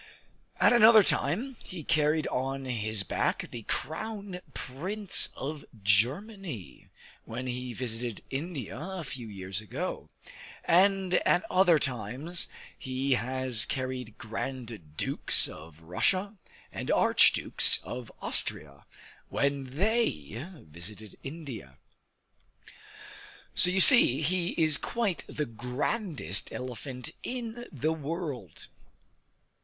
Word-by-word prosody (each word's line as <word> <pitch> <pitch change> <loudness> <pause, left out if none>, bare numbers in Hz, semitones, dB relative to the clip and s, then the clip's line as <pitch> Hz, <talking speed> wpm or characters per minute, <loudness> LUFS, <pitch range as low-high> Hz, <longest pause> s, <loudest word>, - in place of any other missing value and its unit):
At - - +6
another 220 -2 +8
time 225 - 0
he 175 -4 -8
carried 155 +1 +2
on 135 +1 -2
his 110 -4 -1
back - - -1
the 120 - -6
Crown 200 +2 -3
Prince 185 +12 +3
of 150 +1 -5 0.2
Germany, 135 - -1 0.4
when 120 +3 -5
he 125 0 -4
visited 120 -2 -4
India 140 - -4
a 185 +2 -5
few 130 -5 -7
years 95 -1 -4
ago; 105 - -5 0.6
and 190 +1 +3
at 180 - +2
other 180 -3 +5
times 130 - -2 0.3
he 130 +1 -3
has 125 -1 +1
carried 130 -4 -4
Grand 115 - -6
Dukes - - +1
of 80 0 -12
Russia 185 - 0 0.4
and - - -6
Arch - - +5
Dukes - - +4
of 125 -2 -7
Austria 70 -2 -1 0.4
when 140 -1 0
they 135 - -1
visited 90 +7 -10
India. 135 - -8 1.8
So 180 - +4
you 190 +1 +1
see, 160 - +9
he 175 +2 0
is 155 -3 +4
quite 220 -8 -2
the 150 - -3
grandest 125 - -3
elephant 125 0 -6
in 240 -1 -5
the 155 +1 -1
world. 150 - -5
135 Hz, 105 wpm, -29 LUFS, 115-180 Hz, 1.8 s, see